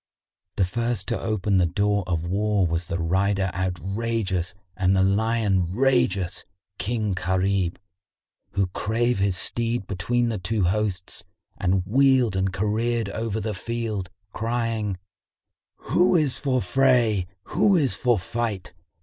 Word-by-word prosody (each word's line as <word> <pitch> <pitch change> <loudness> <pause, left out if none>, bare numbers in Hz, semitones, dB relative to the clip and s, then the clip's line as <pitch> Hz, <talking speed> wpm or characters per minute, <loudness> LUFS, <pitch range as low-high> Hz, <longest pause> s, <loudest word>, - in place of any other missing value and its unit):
The 95 - +2
first 115 +1 -2
to - - -1
open 105 -2 0
the 90 -2 +4
door 100 +3 +1
of 85 -2 -1
war 100 +2 +1
was 85 +1 -1
the 85 - -2
rider 95 +3 +1
outrageous 95 0 -2 0.2
and 95 +1 +2
the 95 - +4
lion 100 -2 +2
rageous, 120 -8 +1 0.4
King 110 -2 -1
Gharib, 95 0 0 0.8
who 95 -2 0
drave 115 +1 0
his 100 -2 +1
steed 115 +2 -1
between 115 +6 0
the 110 -3 -2
two 105 +3 -1
hosts 95 0 -1 0.3
and 90 0 0
wheeled 130 -1 +3
and 95 0 +1
careered 110 +3 0
over 110 +1 -2
the 110 0 -3
field, 110 -2 -3 0.2
crying, 115 -3 -1 0.9
"Who 180 +1 +4
is 150 -6 +2
for 130 -4 0
fray, 115 -3 +3 0.2
who 200 +1 +3
is 145 -7 +3
for 120 -3 +2
fight? 105 -3 -3
105 Hz, 130 wpm, -24 LUFS, 95-115 Hz, 0.9 s, the